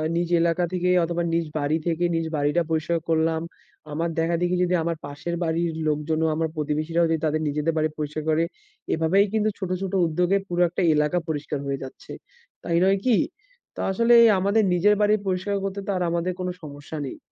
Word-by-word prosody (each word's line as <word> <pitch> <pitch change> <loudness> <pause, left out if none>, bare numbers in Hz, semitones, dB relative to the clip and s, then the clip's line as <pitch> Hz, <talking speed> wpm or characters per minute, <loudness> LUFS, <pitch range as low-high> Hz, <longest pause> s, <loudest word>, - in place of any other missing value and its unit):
নিজ 170 0 0
এলাকা 170 +1 +1
থেকে 180 0 0 0.2
অথবা 170 0 -2
নিজ 165 0 +1
বাড়ি 145 +2 +1
থেকে 170 +1 0
নিজ 165 - 0
বাড়িটা 150 +3 +1
পরিষ্কার 160 +1 0
করলাম। 160 0 +1 0.5
আমার 165 +3 -1
দেখা 165 +1 +1
দেখি 180 0 +1
যদি 180 - 0
আমার 165 -1 -2
পাশের 145 +4 -5
বাড়ির 165 0 0 0.2
লোকজনও, 155 +2 0
আমার 160 0 -1
প্রতিবেশীরাও 155 +3 0
যদি 160 -1 +1
তাদের 155 0 0
নিজেদের 150 +3 0
বাড়ি 155 0 +2
পরিষ্কার 150 0 -4
করে, 160 +1 +3 0.5
এভাবেই 165 +5 +3
কিন্তু 215 0 +2
ছোট, 190 -3 -3
ছোট 195 -1 -4
উদ্যোগে 180 +4 +1
পুরো 175 -1 -1
একটা 175 - -3
এলাকা 150 +3 +1
পরিষ্কার 150 -2 -3
হয়ে 140 0 -2
যাচ্ছে। 130 - -11 0.5
তাই 170 -1 0
নয় 195 +1 +4
কি? 245 -4 +4 0.6
তো - - -9
আসলে 230 +4 +4 0.2
আমাদের 200 +3 +2
নিজের 205 +4 +4
বাড়ি 210 0 +4
পরিষ্কার 185 +2 -1
করতে 195 0 -3
তো - - 0
আর 180 - 0
আমাদের 170 +2 -1
কোন 180 - -2
সমস্যা 145 0 -8
নেই। 130 - -7
165 Hz, 185 wpm, -24 LUFS, 155-180 Hz, 0.6 s, নয়